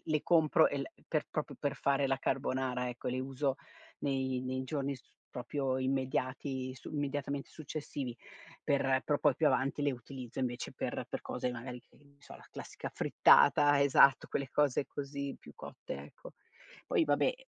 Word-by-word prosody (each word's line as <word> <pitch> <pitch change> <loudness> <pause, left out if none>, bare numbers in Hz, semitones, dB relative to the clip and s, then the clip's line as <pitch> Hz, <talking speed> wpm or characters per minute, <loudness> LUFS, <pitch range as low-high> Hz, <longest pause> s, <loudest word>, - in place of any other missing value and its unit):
le 155 -2 0
compro 160 -3 +5
e 140 - -3
le 140 - -5 0.2
per 155 -2 0
proprio 150 -3 -3
per 140 -1 -1
fare 140 0 +2
la 135 - +1
carbonara 130 -2 -1
ecco, 120 0 -5
le 125 - -1
uso 135 +1 -1 0.4
nei 130 -2 0
nei 130 0 -2
giorni 140 0 -2
s 125 - -20 0.3
proprio 130 +1 -2
immediati 130 0 -1
su 125 - -10
immediatamente 145 -1 -2
successivi, 145 -5 -5 0.5
per 135 -2 +2
però 145 -1 +1
poi 145 -3 +4
più 160 - +3
avanti 140 +2 +1
le 145 - +2
utilizzo 125 0 -8
invece 120 -2 -3
per - - -4
per - - -4
cose 125 - -2
magari 125 +1 -7
che - - -27
ne 140 -1 -23
so - - -12
la - - -16
classica - - -7
frittata 145 0 +5
esatto, 140 -1 +6
quelle 140 -2 -2
cose 145 -2 +2
così 140 -1 -5
più - - -14
cotte - - -8
ecco. 75 - -13 0.5
Poi - - +3
vabbè 145 -1 +2
e - - -19
135 Hz, 170 wpm, -33 LUFS, 130-145 Hz, 0.5 s, esatto